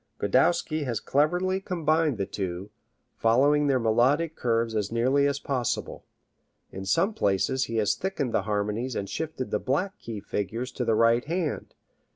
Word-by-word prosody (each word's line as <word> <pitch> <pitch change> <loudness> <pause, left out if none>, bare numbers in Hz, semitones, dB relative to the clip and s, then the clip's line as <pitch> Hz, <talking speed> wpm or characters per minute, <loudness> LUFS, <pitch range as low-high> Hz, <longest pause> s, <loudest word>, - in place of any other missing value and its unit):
Godowsky 155 - +2
has 120 -4 -2
cleverly 180 +6 +1
combined 160 - +1
the 100 - -1
two, 95 0 -5 0.5
following 140 +6 +3
their 135 -2 +3
melodic 130 +8 +2
curves 115 -1 0
as 105 -2 -1
nearly 130 +5 +2
as 140 - 0
is - - -5
possible. 125 -4 -2 0.7
In 95 0 -7
some 180 - +2
places 130 - +1
he 115 - -5
has 105 -2 +2
thickened 160 -10 -3
the - - +2
harmonies 105 +4 -1
and 100 - -3
shifted 155 -3 -4
the 105 - +1
"black 180 - -1
key" 115 -3 -6
figures 110 +6 -4
to 125 - -3
the 115 -1 +2
right 115 +2 +3
hand. 165 -1 -3
125 Hz, 165 wpm, -27 LUFS, 110-150 Hz, 0.7 s, following